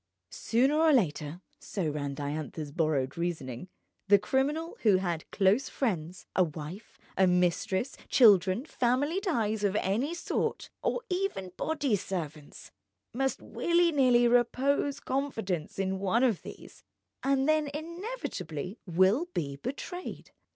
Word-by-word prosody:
Sooner 265 +7 +2
or 320 0 +5
later 165 - +1 0.2
(so 190 -6 -3
ran 145 -2 -3
Diantha's 145 +1 -4
borrowed 155 -2 0
reasoning) 165 -3 -3 0.4
the 205 0 +7
criminal 290 - -1
who 205 -4 +5
has 175 -4 -2
close 205 +7 +2
friends, 180 - -2
a 185 - +5
wife, 160 +6 -7 0.2
a 190 0 +4
mistress, 180 +6 +1
children, 200 -1 +5
family 285 +6 +1
ties 220 - 0
of 200 -1 +1
any 230 - 0
sort, 345 - -2
or 485 - -1
even 360 - -2
body 290 -8 0
servants, 155 -6 -6 0.4
must 270 +2 -1
willy 345 0 +2
nilly 250 -5 +4
repose 260 +4 +2
confidence 225 - -3
in 190 0 -1
one 200 +6 +2
of 230 -8 +2
these, - - -12 0.4
and 270 0 +2
then 310 -1 +2
inevitably 315 - -5
will 190 - +3
be 140 -3 -2
betrayed. 280 - -6
210 Hz, 125 wpm, -29 LUFS, 175-275 Hz, 0.4 s, the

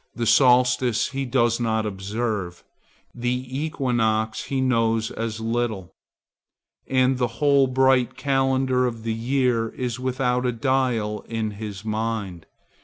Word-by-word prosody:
The 120 - -2
solstice 125 -1 +4
he 135 0 -3
does 120 -2 +1
not 110 -2 0
observe; 100 -2 -3 0.5
the 125 +1 -2
equinox 120 -7 -1
he 135 - -2
knows 115 -3 +1
as 115 -1 -4
little; 115 -5 -2 0.9
and 130 0 +2
the 125 - +2
whole 140 -1 +4
bright 130 -1 +2
calendar 135 -2 +1
of 115 -2 -6
the 115 -1 -1
year 120 -1 0
is 125 0 -4
without 125 -1 0
a 125 - +1
dial 115 -4 0
in 110 -2 -2
his 105 -1 -7
mind. 110 -5 -3
120 Hz, 125 wpm, -23 LUFS, 110-130 Hz, 0.9 s, solstice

